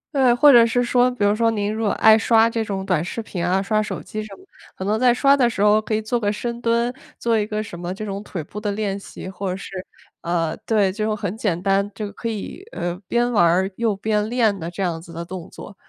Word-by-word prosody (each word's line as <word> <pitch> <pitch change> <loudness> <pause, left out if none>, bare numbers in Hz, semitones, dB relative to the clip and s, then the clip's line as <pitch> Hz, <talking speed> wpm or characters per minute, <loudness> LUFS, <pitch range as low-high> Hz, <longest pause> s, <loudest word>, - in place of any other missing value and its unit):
对， 260 -3 +5
或 285 +4 +6
者 240 -3 +8
是 245 +2 +1
说， 245 +1 +3
比 245 -4 -3
如 205 0 +4
说， 230 +1 +2
您 205 -1 -1
如 220 +1 -2
果 205 - +2
爱 220 0 +6
刷 225 0 +4
这 230 -1 -2
种 195 -2 -4
短 180 -5 +1
视 205 +6 -4
频 180 -5 -4
啊、 185 +2 +2
刷 215 +1 +1
手 210 - -5
机 215 - -5
什 215 -2 -9
么， - - -19 0.3
可 - - -6
能 210 +3 0
在 250 0 +5
刷 275 +3 +4
的 245 -3 +3
时 215 - -4
候 210 +1 +5
可 215 0 -2
以 215 - 0
做 225 +3 -1
个 205 -2 0
深 235 +2 -4
蹲， 235 +1 +1 0.2
做 230 -2 +1
一 210 - -1
个 215 -1 -2
什 175 -5 -9
么 175 +1 -4
这 215 +3 -6
种 200 -1 -4
腿 185 -5 -6
部 200 +7 -8
的 210 -1 -2
练 200 -1 -2
习， 190 - -9
或 190 +1 -4
者 180 - -2
是， 195 - -8 0.5
呃， 170 -2 -1
对， 205 -4 +2
就 215 +2 -1
很 205 -1 -4
简 185 -6 -1
单， 200 0 +2
就 210 0 -5
可 230 - -6
以， 225 - -5
呃， 175 0 -2
边 240 +1 +1
玩 215 - +3
儿， 185 +3 +2
又 230 -3 +1
边 210 +1 -1
练 225 -4 +2
的 165 0 -5
这 180 +3 -4
样 165 -3 -2
子 170 0 -13
的 170 +1 -5
动 175 0 -8
作。 200 - -11
210 Hz, 285 characters per minute, -22 LUFS, 195-230 Hz, 0.5 s, 者